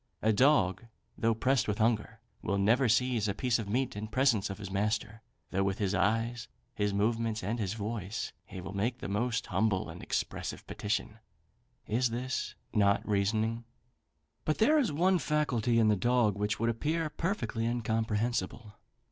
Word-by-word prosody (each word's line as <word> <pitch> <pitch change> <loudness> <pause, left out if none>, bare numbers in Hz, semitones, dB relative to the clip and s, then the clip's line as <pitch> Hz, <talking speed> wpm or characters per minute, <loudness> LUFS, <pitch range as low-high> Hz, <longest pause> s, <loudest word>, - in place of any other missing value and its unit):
A 110 0 +4
dog, 120 -6 +3 0.3
though 115 0 +1
pressed 130 +2 +2
with 105 -1 -1
hunger, 110 0 0 0.2
will 100 - -1
never 115 +6 +3
seize 120 -1 +2
a 100 - -1
piece 125 0 +1
of 105 -3 -5
meat 125 +2 0
in 105 +1 -4
presence 115 -3 +2
of 100 - -5
his 100 -2 -7
master, 105 +2 -1 0.3
though 95 - +1
with 95 0 0
his 100 -2 0
eyes, 115 +5 0 0.3
his 105 -1 0
movements, 110 +1 0
and 110 +5 -2
his 100 -1 -2
voice, 105 -1 -4
he 95 - -8
will 95 - -7
make 115 +5 -1
the - - -6
most 115 +4 -1
humble 105 -4 0
and - - -10
expressive - - -3
petition. 105 +1 -3 0.7
Is 120 +3 +1 0.6
not 100 -3 +3
this - - -17
reasoning? 110 +3 0 0.8
But 155 - 0
there 300 +8 +5
is 255 - +1
one 180 +5 +3
faculty 125 -7 +1
in 110 -2 +5
the 105 - +4
dog 120 -1 +2
which 105 +1 -1
would 115 +1 +2
appear 155 +7 -1
perfectly 120 - -2
incomprehensible. 115 -2 -1
110 Hz, 165 wpm, -31 LUFS, 105-120 Hz, 0.8 s, there